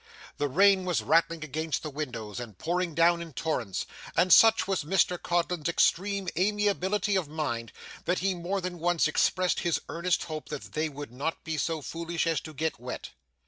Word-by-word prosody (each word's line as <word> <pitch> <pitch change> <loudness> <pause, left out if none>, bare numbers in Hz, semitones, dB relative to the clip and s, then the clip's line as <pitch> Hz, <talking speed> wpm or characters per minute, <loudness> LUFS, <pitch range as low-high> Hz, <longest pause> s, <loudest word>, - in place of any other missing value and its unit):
The 145 - 0
rain 195 +6 +5
was 180 -3 0
rattling 165 0 +2
against 155 0 -3
the 155 - -4
windows 125 -7 -5
and 115 -6 -8
pouring 175 -1 -1
down 170 +1 +4
in 165 -3 -8
torrents, 120 - -2 0.3
and 185 - +6
such 225 -3 +6
was 190 -5 0
Mr 180 +2 +1
Codlin's 175 -2 0
extreme 195 +3 +1
amiability 205 +1 +1
of 185 -5 0
mind, 130 -7 -3 0.3
that 180 +1 +1
he 195 0 +1
more 180 +3 -2
than 180 -1 -5
once 170 -1 +2
expressed 185 +3 +2
his 170 -3 0
earnest 170 +1 0
hope 155 -2 -6
that 150 -2 -7
they 155 +1 0
would 145 -3 -8
not 140 +6 -3
be 160 -3 -3
so 155 0 -2
foolish 165 +4 -3
as 165 -3 +1
to 155 - -9
get 160 -1 -2
wet. 125 +1 -6
165 Hz, 185 wpm, -28 LUFS, 150-180 Hz, 0.3 s, and